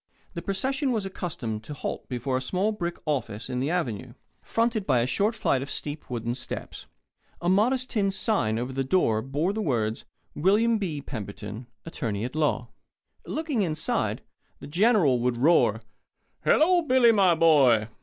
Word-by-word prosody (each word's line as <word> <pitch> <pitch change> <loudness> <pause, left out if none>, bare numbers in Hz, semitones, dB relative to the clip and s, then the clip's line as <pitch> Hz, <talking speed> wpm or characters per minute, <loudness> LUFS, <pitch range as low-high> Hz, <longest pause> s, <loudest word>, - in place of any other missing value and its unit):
The 170 - -5
procession 265 - -1
was 220 -5 -1
accustomed 140 - -4
to 150 - -7
halt - - -5
before 130 +1 -2
a 130 - 0
small 185 +10 0
brick 175 -5 -4
office 125 -6 -3
on 125 - -1
the 135 +3 -1
Avenue, 160 - -2 0.3
fronted 225 -3 0
by 125 -4 +3
a - - +1
short 205 - 0
flight 135 -11 +1
of 140 - -6
steep 150 +1 -5
wooden 120 -1 -2
steps. 125 - -6 0.5
A 175 - -3
modest 245 +7 +2
tin 200 -4 +1
sign 190 - 0
over 125 +3 -3
the 135 +1 -1
door 130 -7 +2
bore 145 - -1
the 220 - -2
words: 115 - -1 0.3
"Wm. 215 +7 +3
B. 155 -8 -3
Pemberton: 105 -1 -7 0.2
Attorney 115 -10 -3
at 125 - -6
Law." 145 -6 0 0.6
Looking 305 -7 -1
inside, 160 -5 -1 0.3
the - - -11
General 170 - +3
would 120 0 0
roar: 155 +8 +4 0.6
"Hello, 350 +3 +4
Billy, 255 -6 +5
my 195 -5 +4
boy." 135 -10 +5
155 Hz, 165 wpm, -26 LUFS, 125-205 Hz, 0.6 s, Billy